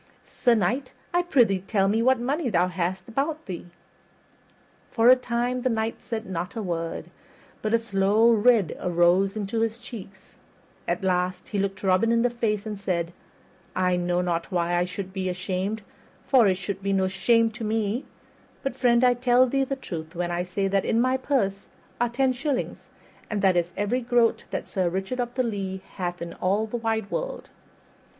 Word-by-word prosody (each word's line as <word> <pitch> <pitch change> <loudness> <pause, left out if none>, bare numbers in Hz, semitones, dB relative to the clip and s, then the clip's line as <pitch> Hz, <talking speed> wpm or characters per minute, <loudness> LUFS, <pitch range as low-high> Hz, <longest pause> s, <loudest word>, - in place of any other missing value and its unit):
Sir 240 -2 +2
Knight, 245 +7 0 0.2
I 350 - +4
prythee 240 - +3
tell 195 +1 +1
me 215 +3 +2
what 260 +1 +4
money 275 +3 -1
thou 180 -2 +2
hast 180 +1 -2
about 295 +7 -2
thee." 180 -3 -6 1.2
For 230 +1 +4
a 255 - +10
time 250 0 -1
the 255 - +1
Knight 225 -1 -2
said 225 -1 -4
not 180 +1 -4
a 225 - -2
word, 165 -3 -4 0.5
but 215 - -1
a - - +6
slow 220 0 +3
red 225 -5 +4
arose 180 +3 +2
into 215 +2 -2
his 225 0 -1
cheeks; 195 -6 -11 0.5
at 215 - -1
last 185 0 0
he 205 - -1
looked 195 0 -2
Robin 195 +4 +3
in 230 0 +3
the 245 - +2
face 215 -3 -1
and 210 -2 -5
said, 175 -3 -2 0.6
"I 185 -1 +2
know 175 0 0
not 170 -1 -2
why 175 -1 +1
I 175 0 +2
should 185 +1 -6
be 190 -1 -2
ashamed, 190 +3 -3 0.4
for 250 -6 +5
it 190 - +3
should 195 +1 -5
be 195 0 0
no 190 -1 +2
shame 225 +4 +3
to 220 +1 -8
me; 220 +3 -1 0.6
but, 270 - -2
friend, 240 -1 +3
I 250 -1 +6
tell 245 +1 +4
thee 270 +2 +1
the 275 +1 -2
truth, 165 -11 -7
when 175 0 -2
I 175 +1 -1
say 195 +2 -1
that 195 0 +1
in 225 - +1
my 255 +2 +3
purse 230 -8 -1 0.3
are 240 0 +2
ten 260 +2 +1
shillings, 270 +1 -3 0.4
and 205 -2 -2
that 190 -1 +5
that 175 - +3
is 170 +1 -4
every 210 +5 0
groat 240 -1 +2
that - - -3
Sir 185 -3 0
Richard 190 +8 -3
of 240 0 -2
the 255 - +2
Lea 195 -5 -3 0.2
hath 175 -2 -3
in 170 - -7
all 200 +4 0
the 220 +2 -4
wide 225 -3 -2
world." - - -4
205 Hz, 190 wpm, -25 LUFS, 185-240 Hz, 1.2 s, a